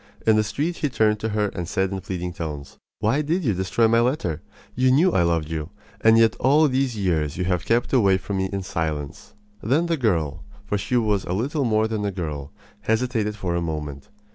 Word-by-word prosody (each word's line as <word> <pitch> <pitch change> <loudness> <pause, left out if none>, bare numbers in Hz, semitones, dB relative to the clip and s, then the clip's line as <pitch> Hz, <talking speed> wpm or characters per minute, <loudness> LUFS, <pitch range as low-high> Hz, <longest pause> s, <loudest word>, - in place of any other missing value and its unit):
In 110 - +5
the 110 - +3
street 155 +10 -2
he 150 - -1
turned 110 -3 +2
to 110 - -2
her 105 -1 0
and 90 -3 -5
said 95 0 0
in 95 -1 -4
pleading 90 -2 -4
tones: 75 -5 -7 0.2
"Why 115 +8 +2
did 165 +5 -1
you 115 -7 +2
destroy 95 +5 +1
my 115 +1 +4
letter? 115 - 0 0.3
You 130 +1 +2
knew 160 +8 +4
I - - +2
loved 85 -2 +1
you, 80 0 -4 0.3
and 110 0 +6
yet 115 -1 +4
all 150 +4 +4
these 130 -3 0
years 80 -7 0
you 90 - -1
have 90 -2 -1
kept 120 +3 +1
away 100 -7 +4
from 95 +1 -4
me 95 0 -1
in 100 -1 -3
silence." 80 -6 -4 0.3
Then 140 +10 +1
the 170 -1 0
girl 85 - 0 0.2
for 105 -1 -1
she 125 +6 0
was 105 -4 0
little 130 - -1
more 110 -1 +2
than 110 -2 -3
a 100 - -1
girl 75 -7 -5 0.3
hesitated 110 -2 0
for 95 -4 -3
a 85 - 0
moment. 75 -4 -5
105 Hz, 215 wpm, -23 LUFS, 85-120 Hz, 0.3 s, and